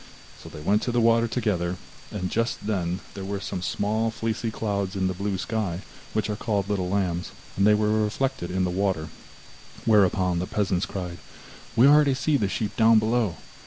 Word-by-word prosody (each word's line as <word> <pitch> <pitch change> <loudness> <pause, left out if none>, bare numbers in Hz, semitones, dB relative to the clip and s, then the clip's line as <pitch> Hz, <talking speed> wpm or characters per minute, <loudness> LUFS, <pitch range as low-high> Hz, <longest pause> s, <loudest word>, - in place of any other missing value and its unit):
So - - -10
they 75 - -9
went 100 +7 +2
to 120 - -1
the 120 - +2
water 115 0 +4
together, 95 -7 -1 0.3
and 95 -3 -4
just 115 -2 -1
then 90 -3 -1
there 100 - -6
were 100 +1 -3
some 95 - -4
of - - -7
the - - 0
small 110 +2 0
fleecy 115 +1 -2
clouds 100 -3 -2
in 95 -1 0
the 95 - 0
blue 100 +1 -2
sky, 100 -3 -2 0.3
which 110 - 0
are 105 - -2
called 105 -2 -1
little 95 -3 -1
lambs, 90 -3 -1 0.3
and 100 +1 +3
they 105 - +6
were 105 +1 +2
reflected 130 0 -1
in 95 +1 0
the 90 - 0
water, 95 -4 -1 0.8
whereupon 95 -4 +3
the 90 - -2
peasants 95 -3 0
cried: 90 -3 -5 0.6
'We 120 +2 +6
already 145 -1 +6
see 150 +3 +1
the 105 -8 +1
sheep 105 +1 -3
down 115 0 +6
below! 110 -4 +1
100 Hz, 200 wpm, -25 LUFS, 95-110 Hz, 0.8 s, they